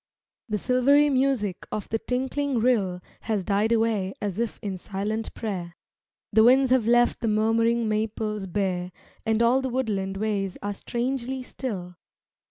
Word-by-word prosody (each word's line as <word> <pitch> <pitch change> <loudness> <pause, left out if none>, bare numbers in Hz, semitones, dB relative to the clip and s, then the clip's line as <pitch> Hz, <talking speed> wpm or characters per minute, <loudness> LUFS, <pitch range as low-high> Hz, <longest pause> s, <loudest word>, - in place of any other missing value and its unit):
The 210 - 0
silvery 275 +6 +4
music 255 -8 0
of 210 - -3
the 225 - -1
tinkling 265 +2 -1
rill 210 -7 +1 0.2
Has 210 -5 -2
died 210 +2 +1
away 220 -4 +1
as 205 -1 -3
if 235 -2 -2
in 200 -2 -3
silent 210 +4 -3
prayer; 180 -6 -4 0.6
The 220 +1 +6
winds 260 +2 +5
have 255 -4 +3
left 240 0 +4
the 230 - -2
murmuring 225 +2 +2
maples 215 -1 -2
bare 180 -1 -1 0.4
And 220 +1 +3
all 250 +3 +4
the 265 - -2
woodland 205 -7 -1
ways 200 -3 -1
are 205 0 -2
strangely 255 +4 -3
still. 185 -10 -6
220 Hz, 150 wpm, -26 LUFS, 200-250 Hz, 0.6 s, The